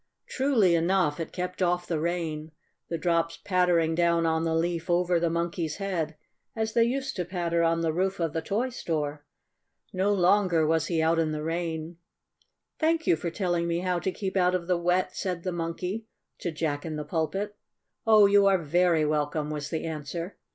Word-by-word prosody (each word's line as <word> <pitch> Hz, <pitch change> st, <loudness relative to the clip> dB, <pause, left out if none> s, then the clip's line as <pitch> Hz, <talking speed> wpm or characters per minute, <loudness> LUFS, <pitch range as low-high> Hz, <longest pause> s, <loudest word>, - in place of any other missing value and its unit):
Truly 255 Hz, -10 st, +2 dB
enough 170 Hz, -2 st, +2 dB
it 165 Hz, -, -4 dB
kept 180 Hz, +1 st, -4 dB
off 175 Hz, 0 st, +1 dB
the 165 Hz, -3 st, -1 dB
rain, 160 Hz, -2 st, -2 dB, 0.4 s
the 165 Hz, -, -1 dB
drops 165 Hz, -1 st, 0 dB
pattering 180 Hz, -4 st, +2 dB
down 170 Hz, 0 st, +2 dB
on 160 Hz, 0 st, +1 dB
the 160 Hz, 0 st, +1 dB
leaf 170 Hz, +1 st, -1 dB
over 175 Hz, 0 st, +2 dB
the 170 Hz, 0 st, +1 dB
Monkey's 170 Hz, -1 st, -2 dB
head 175 Hz, -6 st, -2 dB, 0.4 s
as 220 Hz, -1 st, -2 dB
they 230 Hz, -1 st, +4 dB
used 270 Hz, +3 st, -2 dB
to 180 Hz, -, 0 dB
patter 170 Hz, -1 st, -1 dB
on 165 Hz, 0 st, +2 dB
the 160 Hz, -1 st, 0 dB
roof 190 Hz, +3 st, 0 dB
of 165 Hz, -3 st, -1 dB
the 160 Hz, -, -1 dB
toy 220 Hz, +10 st, -1 dB
store. 150 Hz, -, -3 dB, 0.7 s
No 190 Hz, +2 st, +1 dB
longer 185 Hz, -3 st, +3 dB
was 160 Hz, 0 st, +1 dB
he 165 Hz, -2 st, +1 dB
out 165 Hz, +1 st, +3 dB
in 155 Hz, -1 st, +1 dB
the 150 Hz, 0 st, -3 dB
rain. 165 Hz, 0 st, -3 dB, 0.8 s
"Thank 325 Hz, 0 st, +1 dB
you -, -, +4 dB
for 170 Hz, +2 st, -3 dB
telling 175 Hz, -1 st, -1 dB
me 170 Hz, 0 st, 0 dB
how 180 Hz, -1 st, 0 dB
to 190 Hz, -, -1 dB
keep 190 Hz, 0 st, -4 dB
out 180 Hz, -1 st, +3 dB
of 175 Hz, -2 st, -2 dB
the 180 Hz, +1 st, +2 dB
wet," 180 Hz, +2 st, 0 dB
said 180 Hz, -3 st, -3 dB
the 185 Hz, -, -2 dB
Monkey 180 Hz, +6 st, -4 dB, 0.3 s
to -, -, -2 dB
Jack 150 Hz, -3 st, -2 dB
in 160 Hz, -2 st, -4 dB
the 150 Hz, 0 st, -4 dB
Pulpit. 195 Hz, +7 st, -2 dB, 0.5 s
"Oh, 215 Hz, -2 st, +7 dB
you 200 Hz, 0 st, +5 dB
are 195 Hz, -1 st, +5 dB
very 170 Hz, 0 st, +2 dB
welcome," 150 Hz, 0 st, -1 dB
was 150 Hz, -1 st, -4 dB
the 160 Hz, -, -3 dB
answer. 165 Hz, +3 st, -5 dB
170 Hz, 195 wpm, -27 LUFS, 160-185 Hz, 0.8 s, Oh